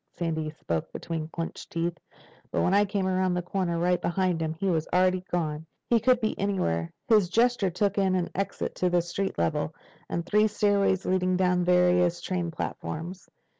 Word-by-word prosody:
Sandy 160 -2 -2
spoke 85 - -4
between 165 -2 -4
clenched 165 +1 -6
teeth. 170 0 -2 0.5
"When 185 - +1
I 205 +1 +5
came 195 -1 -1
around 185 -1 +1
the 180 - -1
corner—right 180 -1 0
behind 180 -1 0
him—he 160 +3 -3
was 165 -4 +1
already 185 0 +3
gone. 160 -2 -2 0.2
He 235 - +5
could 250 +2 +3
be 215 -2 0
anywhere." 85 - 0 0.2
His 210 -6 +4
gesture 235 -2 +2
took 200 +3 0
in 190 -1 +2
an 180 -2 -1
exit 195 +1 -3
to 180 - +2
the 175 -1 +2
street 190 +3 -3
level, 85 -1 -1 0.3
and 170 0 -2
three 210 +3 +3
stairways 200 -2 +1
leading 185 0 +1
down 180 -1 +2
to 175 - 0
various 180 -1 +3
train 175 -1 -2
platforms. 165 +3 -5
180 Hz, 170 wpm, -27 LUFS, 170-195 Hz, 0.5 s, I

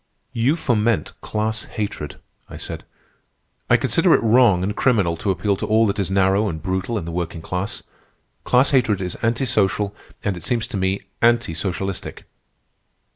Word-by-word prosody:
"You 125 +6 +2
foment 115 - 0
class 110 0 -2
hatred," 100 -8 -5 0.3
I - - -8
said. - - -7 0.8
"I - - +6
consider - - +3
it - - 0
wrong 110 -5 +5
and 105 +2 -2
criminal 100 -10 +2
to 100 - -3
appeal 95 +2 +1
to - - -3
all 110 +1 +4
that 100 0 -1
is 95 - -1
narrow 95 +2 +2
and 80 - -4
brutal 95 +5 -2
in 90 - -4
the 85 - -5
working 85 -1 -4
class. 90 +5 -4 0.6
Class 125 +2 +3
hatred 120 -7 +3
is 90 -2 -3
anti 115 +3 +1
social, 100 -3 +1 0.3
and, 100 -2 0
it 85 - -8
seems 120 -3 -1
to - - -5
me, 95 +1 0 0.2
anti 115 -6 +3
socialistic." 95 +2 -4
100 Hz, 170 wpm, -21 LUFS, 95-115 Hz, 0.8 s, I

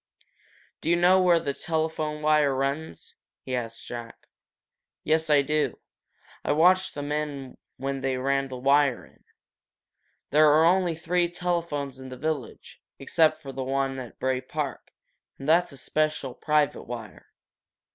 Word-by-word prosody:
"Do - - -2
you 170 - +5
know 180 +2 +5
where 175 -2 +5
the 140 -3 -3
telephone 155 -1 -2
wire 150 -3 +3
runs?" 135 - -3 0.3
he 130 - -3
asked 115 -2 -5
Jack. 120 -1 -9 0.8
"Yes, 160 0 +1
I 145 -2 +5
do," 150 +1 +1
said - - -2
Jack. - - -23 0.6
"I - - 0
watched 180 +4 +4
the 145 - -4
men 145 -2 -4 0.2
when 135 0 -3
they 130 -1 -1
ran 135 +1 0
the 130 -1 -7
wire 140 0 +2
in. - - -25 1.1
There 150 +1 +6
are 155 +2 +5
only 175 -1 +3
three 175 +1 0
telephones 170 -6 -2
in 130 0 -9
the 130 - -8
village, 150 -3 -5 0.2
except 155 +2 +2
for 135 - -6
the 135 0 -4
one 135 0 -1
at 125 -3 -9
Bray 130 -1 -1
Park, 140 0 -5 0.5
and 135 - -8
that's 170 +2 +4
a 140 - -11
special, 150 -1 -1
private 150 0 0
wire. 115 -3 -8
145 Hz, 155 wpm, -26 LUFS, 135-160 Hz, 1.1 s, There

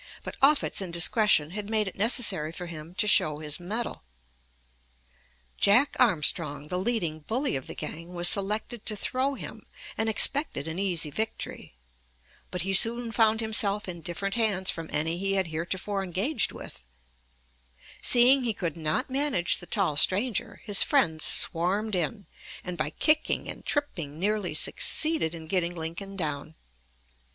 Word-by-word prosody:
But - - -7
Offutt's 280 -5 +3
indiscretion 170 -2 +2
had 205 +2 -6
made 215 -2 +2
it 190 - -6
necessary 205 -8 +1
for 180 +2 -7
him 165 0 -10
to 210 - +1
show 155 -7 +5
his 150 +1 -3
mettle. 210 - -5 1.6
Jack 245 +8 +4
Armstrong, 150 - +1
the 180 - -1
leading 185 -7 -1
bully 245 - -1
of 130 - -5
the - - -8
gang, 170 +2 -7
was 175 0 +2
selected 210 +4 0
to 215 - +1
throw 260 +6 -1
him, - - -9 0.3
and 220 0 +1
expected 220 - +3
an 160 +3 -5
easy 175 -6 0
victory. 220 - -5 0.7
But 180 -1 -3
he 195 +1 -2
soon 230 +4 +3
found 225 -1 +2
himself 215 -2 +1
in 170 -2 -6
different 185 +5 -4
hands 205 -5 +1
from 165 -1 -7
any 160 +3 -1
he 195 +1 0
had 190 -3 0
heretofore 190 +5 -3
engaged 200 - -1
with. - - -11 1.2
Seeing 255 +2 +6
he 230 -3 -1
could 170 -5 -4
not 155 -2 -1
manage 265 -11 +1
the 175 - -11
tall 185 -9 -1
stranger, 225 +7 +2
his 205 -3 +5
friends 165 - +2
swarmed 195 +6 0
in, 185 +3 -2 0.4
and 180 -1 -5
by 155 -2 -2
kicking 305 - +1
and - - -8
tripping 170 - -3
nearly 200 -2 -1
succeeded 305 - +1
in 160 -1 -9
getting 175 0 -1
Lincoln 170 +4 -6
down. 155 -3 -4
195 Hz, 150 wpm, -27 LUFS, 165-225 Hz, 1.6 s, Seeing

